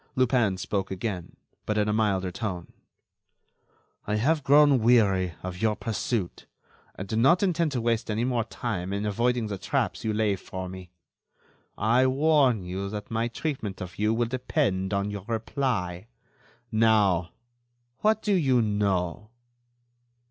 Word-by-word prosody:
Lupin 120 Hz, -6 st, +2 dB
spoke 95 Hz, +1 st, -2 dB
again, 95 Hz, -2 st, -4 dB, 0.3 s
but 105 Hz, -, 0 dB
in 105 Hz, 0 st, +2 dB
a 105 Hz, -, +1 dB
milder 100 Hz, -4 st, +1 dB
tone: 90 Hz, -4 st, -5 dB, 1.3 s
"I 105 Hz, -, 0 dB
have 145 Hz, +7 st, +1 dB
grown 145 Hz, -1 st, +6 dB
weary 100 Hz, -7 st, +3 dB
of 90 Hz, +1 st, -6 dB
your 110 Hz, -1 st, +2 dB
pursuit, 110 Hz, -3 st, -3 dB, 0.5 s
and 95 Hz, -, -6 dB
do 110 Hz, -, -3 dB
not 170 Hz, -, +4 dB
intend 170 Hz, -4 st, +1 dB
to 125 Hz, -, -1 dB
waste 115 Hz, -1 st, 0 dB
any 110 Hz, +2 st, 0 dB
more 120 Hz, -2 st, 0 dB
time 100 Hz, -4 st, -4 dB
in 100 Hz, +1 st, -2 dB
avoiding 120 Hz, +3 st, 0 dB
the 100 Hz, -3 st, -5 dB
traps -, -, -1 dB
you 110 Hz, -, 0 dB
lay 105 Hz, -2 st, +1 dB
for 95 Hz, 0 st, -7 dB
me. 90 Hz, -1 st, -9 dB, 0.9 s
I 120 Hz, +5 st, +3 dB
warn 135 Hz, -5 st, +3 dB
you 95 Hz, +2 st, -4 dB
that 105 Hz, +1 st, -7 dB
my 115 Hz, +1 st, 0 dB
treatment 120 Hz, -6 st, -4 dB
of 95 Hz, +1 st, -8 dB
you 105 Hz, +1 st, +2 dB
will 115 Hz, +1 st, +1 dB
depend 120 Hz, -, -1 dB
on 100 Hz, 0 st, -1 dB
your 100 Hz, -2 st, -6 dB
reply. 110 Hz, -5 st, -2 dB, 0.6 s
Now, 105 Hz, -6 st, +3 dB, 0.7 s
what 220 Hz, +1 st, +2 dB
do 210 Hz, -, +1 dB
you 135 Hz, -9 st, +3 dB
know?" 105 Hz, -2 st, -1 dB
110 Hz, 150 wpm, -26 LUFS, 95-125 Hz, 1.3 s, grown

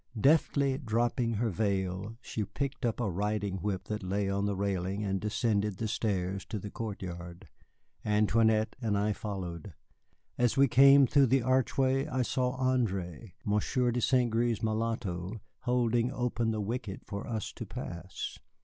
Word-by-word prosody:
Deftly 140 Hz, 0 st, +3 dB
dropping 120 Hz, -1 st, 0 dB
her 115 Hz, +1 st, 0 dB
veil, 100 Hz, +1 st, -1 dB
she 110 Hz, -, -3 dB
picked 140 Hz, +4 st, -3 dB
up 115 Hz, -, -2 dB
a 120 Hz, -, 0 dB
riding 100 Hz, +1 st, -1 dB
whip 95 Hz, 0 st, -2 dB
that 105 Hz, 0 st, -4 dB
lay 100 Hz, +1 st, -1 dB
on 100 Hz, +1 st, 0 dB
the 100 Hz, -, -1 dB
railing 95 Hz, +1 st, -1 dB
and 95 Hz, -2 st, -1 dB
descended 105 Hz, -2 st, 0 dB
the 110 Hz, -, -2 dB
stairs 100 Hz, -3 st, -1 dB
to 110 Hz, -, -5 dB
the 105 Hz, 0 st, -6 dB
courtyard. 90 Hz, -5 st, -6 dB, 0.6 s
Antoinette 110 Hz, +1 st, +3 dB
and 110 Hz, -4 st, +1 dB
I 105 Hz, +1 st, +1 dB
followed. 95 Hz, -5 st, -6 dB, 0.6 s
As 125 Hz, +1 st, +2 dB
we 140 Hz, 0 st, +6 dB
came 135 Hz, +2 st, +7 dB
through 140 Hz, +1 st, +4 dB
the 130 Hz, +1 st, +3 dB
archway 130 Hz, +2 st, +2 dB
I 130 Hz, -3 st, 0 dB
saw 125 Hz, +1 st, -1 dB
André, 110 Hz, -7 st, -1 dB
Monsieur 120 Hz, +4 st, +1 dB
de 125 Hz, +1 st, -1 dB
St. 125 Hz, -2 st, +2 dB
Gré's 115 Hz, -1 st, +1 dB
mulatto, 110 Hz, -3 st, -2 dB, 0.3 s
holding 120 Hz, -1 st, +2 dB
open 120 Hz, -3 st, -1 dB
the 110 Hz, -1 st, -1 dB
wicket 105 Hz, -2 st, -4 dB
for 100 Hz, +1 st, -5 dB
us 110 Hz, -3 st, -3 dB
to -, -, -7 dB
pass. -, -, -6 dB
110 Hz, 155 wpm, -30 LUFS, 100-125 Hz, 0.6 s, came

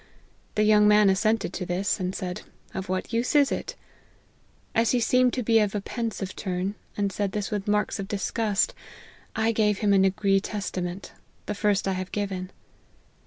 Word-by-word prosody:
The 210 Hz, -, +3 dB
young 210 Hz, 0 st, +5 dB
man 210 Hz, -1 st, +6 dB
assented 215 Hz, 0 st, +1 dB
to -, -, -3 dB
this; 180 Hz, +4 st, -1 dB
and 185 Hz, 0 st, -2 dB
said 180 Hz, -1 st, -4 dB, 0.2 s
' -, -, -31 dB
of 190 Hz, -1 st, -5 dB
what 185 Hz, +4 st, -3 dB
use 235 Hz, +6 st, 0 dB
is 285 Hz, -2 st, +5 dB
it -, -, -3 dB, 0.5 s
!' -, -, -36 dB
As 230 Hz, -, +1 dB
he 250 Hz, -, +3 dB
seemed 250 Hz, +2 st, +3 dB
to 250 Hz, -, -1 dB
be 225 Hz, 0 st, +4 dB
of 210 Hz, -1 st, +1 dB
a -, -, +1 dB
pensive 220 Hz, -4 st, -4 dB
turn, 185 Hz, 0 st, -2 dB, 0.2 s
and 200 Hz, -1 st, 0 dB
said 200 Hz, 0 st, -2 dB
this 210 Hz, -2 st, -3 dB
with 205 Hz, -1 st, -3 dB
marks 210 Hz, 0 st, +1 dB
of 195 Hz, -, -4 dB
disgust, 210 Hz, -, 0 dB, 0.6 s
I 225 Hz, +1 st, +2 dB
gave 210 Hz, -2 st, +2 dB
him 205 Hz, -1 st, +2 dB
a -, -, +5 dB
Nagree 195 Hz, +1 st, +3 dB
Testament; 190 Hz, -3 st, -4 dB, 0.3 s
the -, -, -2 dB
first 205 Hz, -1 st, +1 dB
I -, -, +2 dB
have 185 Hz, 0 st, -4 dB
given. 195 Hz, -3 st, -3 dB
205 Hz, 190 wpm, -26 LUFS, 190-215 Hz, 0.6 s, man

